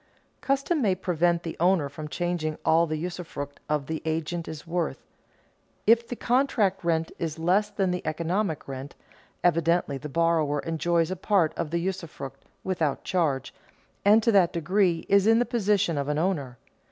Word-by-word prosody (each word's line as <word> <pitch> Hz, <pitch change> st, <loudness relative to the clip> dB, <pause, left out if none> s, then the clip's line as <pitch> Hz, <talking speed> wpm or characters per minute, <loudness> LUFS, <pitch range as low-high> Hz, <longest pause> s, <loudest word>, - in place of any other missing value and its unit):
Custom 275 Hz, +4 st, 0 dB
may 195 Hz, -6 st, +2 dB
prevent 175 Hz, -2 st, +1 dB
the 165 Hz, -, -5 dB
owner 175 Hz, -3 st, +3 dB
from 150 Hz, +2 st, -7 dB
charging 165 Hz, -1 st, -2 dB
all 165 Hz, +1 st, +4 dB
the 155 Hz, 0 st, -2 dB
usufruct 160 Hz, -4 st, -6 dB
of 150 Hz, -2 st, 0 dB
the 160 Hz, +2 st, -4 dB
agent 160 Hz, +2 st, -2 dB
is 155 Hz, -2 st, -7 dB
worth. 170 Hz, +1 st, -2 dB, 0.9 s
If 230 Hz, +1 st, +4 dB
the 245 Hz, -, -4 dB
contract 235 Hz, -7 st, +1 dB
rent 165 Hz, -1 st, 0 dB
is 165 Hz, -2 st, -3 dB
less 185 Hz, +6 st, +2 dB
than 195 Hz, -3 st, 0 dB
the 180 Hz, -, -2 dB
economic 165 Hz, +2 st, -2 dB
rent, 135 Hz, +1 st, -7 dB, 0.5 s
evidently 170 Hz, -4 st, +2 dB
the 150 Hz, -, -7 dB
borrower 160 Hz, -1 st, +1 dB
enjoys 165 Hz, +1 st, 0 dB
a -, -, -1 dB
part 185 Hz, -3 st, +2 dB
of 165 Hz, -3 st, -3 dB
the 170 Hz, -, -1 dB
usufruct, 170 Hz, -7 st, -5 dB, 0.2 s
without 165 Hz, -7 st, -1 dB
charge, 155 Hz, -8 st, 0 dB, 0.5 s
and 210 Hz, +2 st, +5 dB
to 230 Hz, -, +4 dB
that 190 Hz, -5 st, +4 dB
degree 175 Hz, 0 st, +1 dB
is 200 Hz, +1 st, +4 dB
in 225 Hz, 0 st, +6 dB
the 245 Hz, -, +3 dB
position 205 Hz, -9 st, +1 dB
of 140 Hz, -, -2 dB
an 150 Hz, 0 st, 0 dB
owner. 150 Hz, -8 st, -1 dB
170 Hz, 165 wpm, -26 LUFS, 155-190 Hz, 0.9 s, in